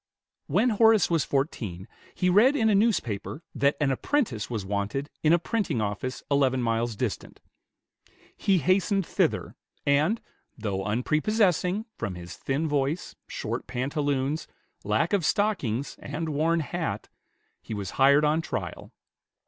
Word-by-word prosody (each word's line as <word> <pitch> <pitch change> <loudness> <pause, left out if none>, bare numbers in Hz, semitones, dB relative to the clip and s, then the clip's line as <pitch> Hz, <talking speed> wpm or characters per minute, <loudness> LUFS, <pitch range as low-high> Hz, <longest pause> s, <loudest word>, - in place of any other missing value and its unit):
When 215 - +3
Horace 220 -3 +5
was 165 -3 +3
fourteen, 110 - -2 0.3
he 180 - +1
read 215 +10 +5
in 220 -5 +3
a - - +4
newspaper 170 - 0
that 140 0 +2
an 145 -3 +2
apprentice 135 - -1
was 110 -5 -3
wanted 100 +9 -2
in 155 - +4
a 170 - +6
printing 195 - -1
office 110 +4 -3
eleven 135 -2 +3
miles 115 -1 0
distant. - - -4 1.0
He 195 -2 +2
hastened 185 +3 +2
thither, - - 0 0.3
and, 150 +10 +3 0.4
though 100 -4 -2
unprepossessing, 180 - +1
from 95 - -3
his 85 0 -8
thin 145 +4 -1
voice, 145 +3 -1
short - - -4
pantaloons, 140 +3 -1 0.4
lack 110 - +1
of 200 -4 +2
stockings, 150 - 0
and 160 +3 -4
worn 160 +3 +1
hat, 165 +2 -3 0.5
he 110 - -6
was 100 -3 -4
hired 140 +2 +6
on 155 +2 +2
trial. - - -5
145 Hz, 135 wpm, -27 LUFS, 120-180 Hz, 1.0 s, a